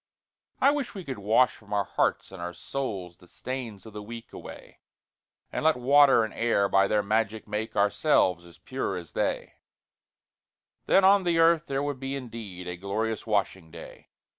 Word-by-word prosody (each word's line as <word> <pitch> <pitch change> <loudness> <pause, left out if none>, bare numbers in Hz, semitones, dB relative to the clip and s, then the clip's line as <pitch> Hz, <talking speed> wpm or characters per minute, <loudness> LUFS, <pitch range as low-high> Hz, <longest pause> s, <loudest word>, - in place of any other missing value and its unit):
I 280 - +5
wish 285 -6 -3
we 190 - -6
could 135 -7 -6
wash 110 +5 +3
from 105 -1 -11
our 100 -1 +2
hearts - - -1
and 95 -2 -9
our 90 0 -5
souls 95 -7 -5
The 90 - -19
stains 120 -2 -6
of 110 - -11
the 105 - -6
week 115 +2 -10
away, - - -11 0.7
And - - -3
let 160 0 +4
water 135 -1 +5
and 110 - -4
air 115 -4 +1
by 95 0 +3
their 105 0 +1
magic 110 +1 -1
make 105 +1 -4
Ourselves 100 - +2
as 85 -1 -16
pure 130 -7 -4
as 85 -3 -9
they; - - -2 1.3
Then 195 - +5
on 195 +1 +6
the 170 -2 +1
earth 165 0 +4
there 135 0 -1
would 145 -2 -3
be 135 +1 -4
indeed 110 -8 -7
A 90 0 -5
glorious 110 +5 -3
washing 95 -5 -1
day! 85 0 -12
110 Hz, 180 wpm, -27 LUFS, 100-135 Hz, 1.3 s, on